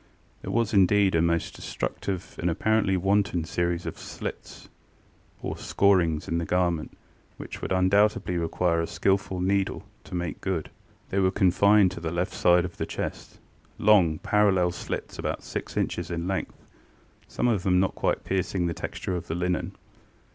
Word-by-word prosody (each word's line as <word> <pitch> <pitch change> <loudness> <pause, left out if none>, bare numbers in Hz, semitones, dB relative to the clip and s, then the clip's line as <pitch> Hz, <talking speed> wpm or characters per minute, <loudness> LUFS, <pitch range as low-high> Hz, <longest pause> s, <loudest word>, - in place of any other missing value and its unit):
ŌĆØ - - -34
There - - -5
was 115 -2 0
indeed 100 0 +4
a 80 - +3
most 85 0 0
destructive 95 -2 -4
and 85 - 0
apparently 105 +2 +2
wanton 95 -2 +1
series 85 +1 -1
of - - -5
slits - - -7 0.8
or - - -3
scorings 85 -6 +2
in 85 - 0
the - - -2
garment, 85 -3 0 0.4
which - - -8
would - - -4
undoubtedly 95 0 +2
require 85 0 +1
a 85 - -2
skilful 95 -1 0
needle 95 +1 0 0.2
to 90 - -7
make 85 -4 -3
good. 90 -5 -2 0.4
They 100 - 0
were 95 -1 +4
confined 100 +1 +4
to 95 - -7
the 85 -1 -3
left 90 +1 -2
side 90 0 +4
of 90 - -8
the - - -3
chestŌĆölong, 95 -7 0
parallel 95 -4 +3
slits, - - -6
about - - -3
six - - -6
inches 85 -2 -1
in 85 0 -3
length, 95 0 -3 0.7
some - - -1
of 110 -6 +2
them 90 -1 +3
not 95 0 +1
quite - - -1
piercing 95 -1 -1
the 85 - -1
texture 90 - -4
of 90 - -5
the 80 - -3
linen. 90 0 -1
90 Hz, 165 wpm, -26 LUFS, 85-100 Hz, 0.8 s, indeed